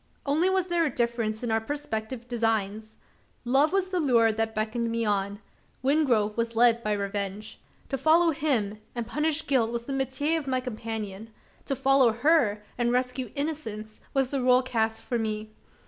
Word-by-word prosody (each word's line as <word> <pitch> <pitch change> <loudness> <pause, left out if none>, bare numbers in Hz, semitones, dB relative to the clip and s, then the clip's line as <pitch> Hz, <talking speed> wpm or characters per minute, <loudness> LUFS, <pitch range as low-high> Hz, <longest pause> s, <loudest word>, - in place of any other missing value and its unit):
Only 310 +6 +2
was 380 -1 +1
there 345 -2 +1
a 310 - +1
difference 235 -3 -1
in 235 - -1
our 225 0 +2
prospective 235 -2 -4
designs. 220 -2 -1 0.5
Love 270 +5 +4
was 380 -1 +1
the 370 -1 -1
lure 235 -7 +4
that 220 0 -2
beckoned 225 +2 -1
me 230 0 -1
on; 200 -1 0 0.4
Wingrove 255 -7 +2
was 230 0 -2
led 235 0 +5
by 210 - 0
revenge. 200 +1 -4 0.3
To 270 - -2
follow 325 +4 +5
him, 235 -9 -1 0.2
and 235 -1 -2
punish 300 +5 -1
guilt, 240 -5 +2
was 235 0 -4
the 275 - -4
metier 270 +4 0
of 290 - -9
my 260 -1 +1
companion; 220 -4 -5 0.4
to 275 - -1
follow 265 -3 +4
her, 240 -5 +2 0.2
and 240 0 +2
rescue 250 0 -1
innocence, 225 -8 -4
was 270 -2 0
the 275 -2 0
role 250 0 +4
cast 225 -3 -1
for 240 -2 -2
me. 215 -1 -3
235 Hz, 175 wpm, -27 LUFS, 220-275 Hz, 0.5 s, led